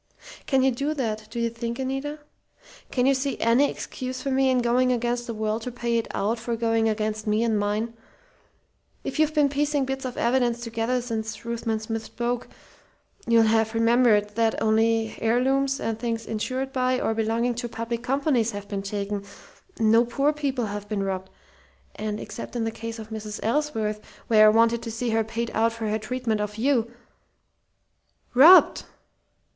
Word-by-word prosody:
"Can 265 -2 +3
you 265 - +4
do 280 +5 -2
that, 220 -5 -3
do 235 - -5
you 235 0 0
think, 235 0 -4
Anita? 270 +3 -3 0.7
Can 250 -1 +1
you 275 - +5
see 275 +1 -2
any 240 +5 +3
excuse 255 0 -6
for 275 +1 -3
me 265 0 +3
in 255 - +3
going 250 +1 +2
against 240 0 -1
the 230 - -3
world 215 +1 -1
to 250 - -5
pay 235 -1 -1
it 225 - -4
out 220 +4 -1
for 235 0 -2
going 225 -1 +1
against 215 0 -2
me 210 +2 +2
and 220 -3 +1
mine? 210 +3 -1 1.1
If - - -4
you've 310 0 +2
been 295 -2 +4
piecing 290 0 0
bits 270 +1 -4
of 255 -1 -5
evidence 240 -1 +1
together 230 +1 -1
since 220 -2 -5
Ruthven 230 -1 -2
Smith 225 0 -4
spoke, 240 0 -3 0.8
you'll 230 -1 +5
have 225 0 +2
remembered 230 -2 +4
that 225 +1 +1
only 225 0 +2
heirlooms 265 +4 +1
and 225 -1 -3
things 230 -1 -3
insured 260 +5 -3
by, 255 0 +1
or 225 - 0
belonging 225 +2 0
to, 240 0 -5
public 230 +1 -4
companies, 255 -2 +1
have 200 0 -7
been 200 -1 -3
taken; 200 0 -3 0.6
no 225 +1 +5
poor 275 +5 +1
people 275 -5 -2
have 205 0 -6
been 205 -2 -1
robbed; 190 -1 -3 0.6
and 210 0 -4
except 235 - -8
in 235 - -1
the 225 - -1
case 230 +1 -6
of 220 0 -9
Mrs. 215 -1 -6
Ellsworth, 225 -5 -1 0.2
where 215 -2 +6
I - - +8
wanted 230 +1 +3
to - - -6
see 230 +1 -2
her 225 0 +2
paid 230 +1 -4
out 225 +1 +2
for 230 -1 -4
her 215 +1 0
treatment 225 -1 -2
of 210 0 -4
you 240 -1 +1 0.7
" - - -45
"'Robbed'!" 310 +9 +7
230 Hz, 180 wpm, -25 LUFS, 220-255 Hz, 1.1 s, I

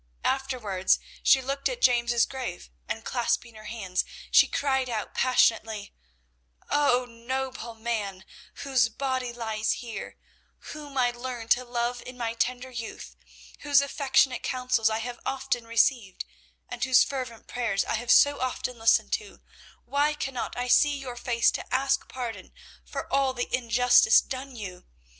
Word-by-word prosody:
Afterwards 245 -9 +1 0.2
she 265 -2 +5
looked 275 +2 -1
at - - -4
James's 240 - +3
grave 255 - -6 0.2
and, - - -4
clasping 235 -2 -1
her 215 -1 -13
hands, 195 -5 -2 0.3
she - - +7
cried 265 -2 0
out 220 -3 -4
passionately, 225 -4 +2 0.8
"Oh, 255 -4 +3
noble 240 0 -5
man, 210 -4 -3 0.4
whose 260 -5 +2
body 255 +1 -2
lies 220 -2 -1
here, 235 -2 -7 0.6
whom 295 -2 -9
I 245 -1 +3
learned 240 -1 -7
to 250 - +4
love 240 0 -2
in 255 0 -10
my 230 -2 -2
tender 250 +2 -2
youth, 230 -2 -7 0.4
whose 285 -1 +4
affectionate 270 -2 +2
counsels 250 -3 +1
I 220 - -1
have 240 +1 -5
often 265 -3 -2
received, 230 -3 +1 0.4
and 245 -1 -5
whose 260 -1 +6
fervent 255 -4 -5
prayers 230 -5 -1
I - - -2
have 235 +1 -3
so 285 0 +6
often 250 -1 -3
listened 225 - +3
to, 440 -2 -4 0.4
why 290 +2 +1
cannot 270 -4 -4
I 245 0 -2
see 290 +3 +4
your 260 -3 -7
face 240 -1 +2
to - - -6
ask 270 +1 +1
pardon 230 -7 -6 0.3
for - - -6
all 270 -1 +2
the 245 - -1
injustice 245 -2 +5
done 265 0 -6
you? 185 -5 -8
245 Hz, 150 wpm, -27 LUFS, 230-265 Hz, 0.8 s, she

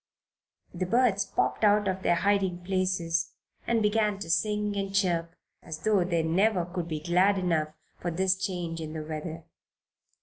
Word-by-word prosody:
The 180 +1 -3
birds 225 -2 +2
popped - - -1
out 205 -1 +4
of 190 0 -1
their 175 - +2
hiding 190 -1 +1
places 180 -3 -1 0.3
and 230 -2 +2
began 210 -1 +2
to 170 -4 -4
sing 210 +2 0
and 195 -1 -3
chirp 170 -4 0 0.3
as 160 -2 -6
though 210 -4 +3
they 170 -2 0
never 180 +3 +2
could 175 -1 -4
be 155 -2 -3
glad 185 +4 +3
enough 165 -5 0 0.3
for 175 - -2
this 185 +2 +2
change 180 -4 -4
in 155 -1 -6
the 155 -1 -4
weather. 160 +1 -6
185 Hz, 165 wpm, -28 LUFS, 165-200 Hz, 0.3 s, out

